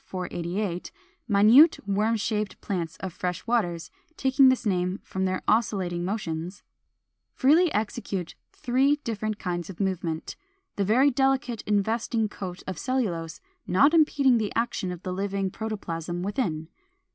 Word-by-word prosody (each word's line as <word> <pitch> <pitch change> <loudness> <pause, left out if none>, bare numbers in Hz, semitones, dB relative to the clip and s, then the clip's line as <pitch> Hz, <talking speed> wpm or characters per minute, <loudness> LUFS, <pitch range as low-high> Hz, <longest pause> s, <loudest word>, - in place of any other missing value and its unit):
488, 180 0 -4 0.4
minute 225 +10 +7
worm 210 +3 +1
shaped 210 0 -2
plants 180 -2 -4
of 190 -3 -5
fresh 180 -1 -4
waters, 175 -8 -1 0.3
taking 265 0 +5
this 260 -2 +1
name 185 -1 0
from 190 0 -3
their 185 0 -2
oscillating 190 -6 +1
motions) 180 -2 -4 0.7
freely 315 +6 +4
execute 205 -4 -3 0.2
three 265 +4 +2
different 215 -2 -3
kinds 175 -3 -4
of 185 - -9
movement, 180 -5 -2 0.4
the 200 - 0
very 250 +8 +4
delicate 260 -3 +1
investing 220 +2 +1
coat 185 -3 -7
of 185 -3 -5
cellulose 190 -11 -2 0.3
not 270 - +4
impeding 280 -6 +4
the 210 -2 -2
action 230 -5 -1
of 180 0 -8
the 185 - -3
living 195 0 -2
protoplasm 175 -6 -4
within. 180 - -2
200 Hz, 135 wpm, -26 LUFS, 180-235 Hz, 0.7 s, minute